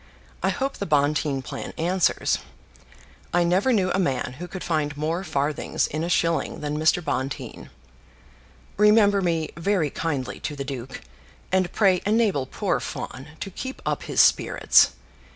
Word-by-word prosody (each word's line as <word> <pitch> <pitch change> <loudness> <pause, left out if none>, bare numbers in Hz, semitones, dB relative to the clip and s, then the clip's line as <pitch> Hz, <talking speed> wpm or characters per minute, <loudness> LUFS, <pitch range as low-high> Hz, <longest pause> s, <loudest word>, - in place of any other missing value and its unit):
I - - +2
hope 275 0 -2
the 200 - -4
Bonteen 145 -2 +1
plan - - -6
answers. 180 +2 +1 1.0
I 175 - +4
never 185 +9 +2
knew 190 -6 +2
a - - +1
man 130 -6 -1
who 175 - -5
could 185 0 -7
find 150 -3 -1
more 160 +5 -1
farthings 150 -3 -1
in 155 +2 -3
a 170 - -2
shilling 165 -1 0
than 150 0 -2
Mr. 155 +2 +2
Bonteen. 130 +2 -4 1.1
Remember 210 -1 +5
me 165 -3 0
very 170 -4 0
kindly 145 -6 -3
to 150 - -4
the 140 -1 -5
duke, 135 -2 -6 0.5
and 185 -1 +2
pray 190 -4 +3
enable 205 - +1
poor - - -1
Fawn 130 +4 -6
to 195 - -4
keep 260 +8 -6
up - - -1
his - - -3
spirits. - - +4
165 Hz, 150 wpm, -24 LUFS, 145-190 Hz, 1.1 s, Remember